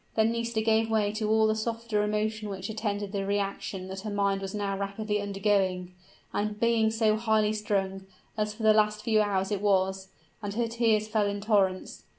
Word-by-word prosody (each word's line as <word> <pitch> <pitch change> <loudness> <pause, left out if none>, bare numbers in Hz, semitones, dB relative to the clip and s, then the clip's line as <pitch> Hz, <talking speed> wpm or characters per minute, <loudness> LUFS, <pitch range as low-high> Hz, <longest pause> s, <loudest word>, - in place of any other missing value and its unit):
Then 220 0 +3
Nisida 230 -1 -1
gave 225 0 +2
way 215 -2 +2
to 215 0 -2
all 220 0 +4
the 215 - +3
softer 225 -1 -1
emotion 215 0 -1
which 195 +1 -5
attended 205 -2 -3
the 200 -1 -2
reaction 195 -1 -2
that 190 0 -5
her 215 - -5
mind 200 -1 0
was 195 +1 -5
now 200 -1 -1
rapidly 205 +1 -2
undergoing, 195 -3 0 0.4
after 210 0 -1
being 225 0 +2
so 220 -1 +2
highly 220 -1 +2
strung, 195 -2 -2 0.3
as 210 -1 -1
for 215 +2 -8
the 215 0 +6
last 215 0 +2
few 220 -2 +3
hours 195 -1 0
it 200 -2 -1
was 190 -1 +1 0.3
and 205 -1 -4
her 235 0 +1
tears 225 -2 +1
fell 215 -1 +1
in 200 0 -2
torrents. 200 -3 0
210 Hz, 190 wpm, -28 LUFS, 200-220 Hz, 0.4 s, the